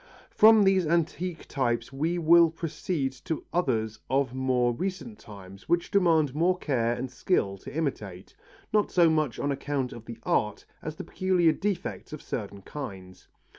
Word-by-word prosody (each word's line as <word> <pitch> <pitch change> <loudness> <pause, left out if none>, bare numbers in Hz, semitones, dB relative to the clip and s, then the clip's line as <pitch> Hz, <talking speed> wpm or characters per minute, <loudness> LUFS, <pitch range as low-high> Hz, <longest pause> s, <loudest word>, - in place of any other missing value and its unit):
From 220 0 +7
these 190 -3 +3
antique 170 +1 -1
types 120 -2 -1
we 160 +6 -1
will 170 0 +6
proceed 160 -3 -3
to 160 - -3
others 110 -11 0
of 135 -1 +1
more 130 -2 +1
recent 195 - -5
times 100 0 -13
which 175 0 +1
demand 165 -8 +3
more 175 +5 +2
care 120 -8 0
and 125 +1 -5
skill 125 - 0
to - - -9
imitate, 105 - -4 0.4
not 210 -1 +3
so 170 -3 +4
much 155 -7 0
on 145 - -1
account 140 -2 -2
of 115 - -11
the 115 -1 -8
art 105 -2 0 0.2
as 155 0 -6
the - - -7
peculiar 185 -3 +2
defects 190 -2 -3
of 155 - -7
certain 100 -3 -6
kinds. 95 -11 -9
150 Hz, 160 wpm, -27 LUFS, 120-170 Hz, 0.4 s, From